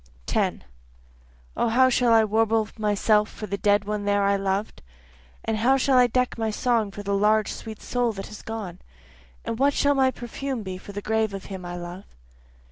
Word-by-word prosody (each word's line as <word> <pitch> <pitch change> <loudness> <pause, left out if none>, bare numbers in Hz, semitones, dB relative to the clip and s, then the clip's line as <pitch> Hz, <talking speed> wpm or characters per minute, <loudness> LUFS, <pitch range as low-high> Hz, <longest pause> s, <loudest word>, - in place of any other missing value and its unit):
10 - - -1 0.9
O 235 - +1
how 260 +3 +5
shall 245 -1 +2
I 225 -1 +6
warble 220 0 +2
myself 210 0 +2
for 215 - -7
the 200 -1 -3
dead 205 0 +2
one 210 0 -3
there 205 0 +2
I 200 0 +3
loved? 195 +1 -2 0.6
And 225 -1 0
how 255 +5 +3
shall 270 0 +2
I 250 - +6
deck 250 0 0
my 225 -1 0
song 225 -1 +1
for 205 +1 -8
the 200 0 -1
large 210 +1 +2
sweet 220 -2 -9
soul 245 -2 0
that 195 -1 -6
has 210 - -10
gone? 205 -6 -6 0.7
And 230 - -3
what 280 +1 +3
shall 285 0 +3
my 265 -1 +3
perfume 250 0 -5
be 185 -1 -6
for 200 - -10
the 205 0 -6
grave 220 -2 0
of 195 - -8
him 185 -1 -7
I 175 0 -5
love? 175 +2 -8
215 Hz, 200 wpm, -25 LUFS, 200-235 Hz, 0.9 s, I